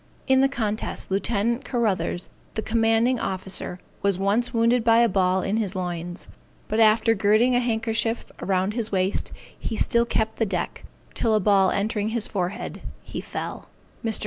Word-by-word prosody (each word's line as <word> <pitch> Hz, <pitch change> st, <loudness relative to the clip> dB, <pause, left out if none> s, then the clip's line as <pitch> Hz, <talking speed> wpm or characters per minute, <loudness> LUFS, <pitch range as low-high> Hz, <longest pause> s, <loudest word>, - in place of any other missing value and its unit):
In 265 Hz, 0 st, +4 dB
the 270 Hz, -, +4 dB
contest 215 Hz, -6 st, -3 dB
Lieut. 195 Hz, +1 st, 0 dB, 0.3 s
Carruthers, 215 Hz, -7 st, -1 dB, 0.3 s
the 220 Hz, -, -2 dB
commanding 225 Hz, +2 st, +2 dB
officer, 190 Hz, -1 st, -2 dB, 0.2 s
was 200 Hz, -2 st, +2 dB
once 210 Hz, +6 st, +1 dB
wounded 230 Hz, 0 st, +2 dB
by 230 Hz, 0 st, +5 dB
a 235 Hz, 0 st, +5 dB
ball 185 Hz, -2 st, +1 dB
in 210 Hz, +3 st, 0 dB
the 195 Hz, -2 st, -3 dB
loins; 175 Hz, 0 st, -4 dB, 0.4 s
but 215 Hz, -, -1 dB
after 225 Hz, +1 st, +5 dB
girding 215 Hz, +4 st, +3 dB
a 245 Hz, -, +4 dB
handkerchief 225 Hz, -1 st, -1 dB
round 190 Hz, +1 st, 0 dB
his 225 Hz, -1 st, -3 dB
waist, 190 Hz, 0 st, 0 dB, 0.3 s
he -, -, -3 dB
still 235 Hz, +2 st, +2 dB
kept 220 Hz, -1 st, -1 dB
the 225 Hz, -, +2 dB
deck, 180 Hz, -3 st, -3 dB, 0.3 s
till 225 Hz, -2 st, +1 dB
a -, -, +4 dB
ball 195 Hz, -1 st, +4 dB
entering 210 Hz, +1 st, -1 dB
his 225 Hz, -1 st, -1 dB
forehead, 185 Hz, -1 st, -4 dB, 0.2 s
he -, -, -6 dB
fell. -, -, -6 dB, 0.4 s
Mr. 225 Hz, -2 st, +1 dB
215 Hz, 165 wpm, -24 LUFS, 195-230 Hz, 0.4 s, by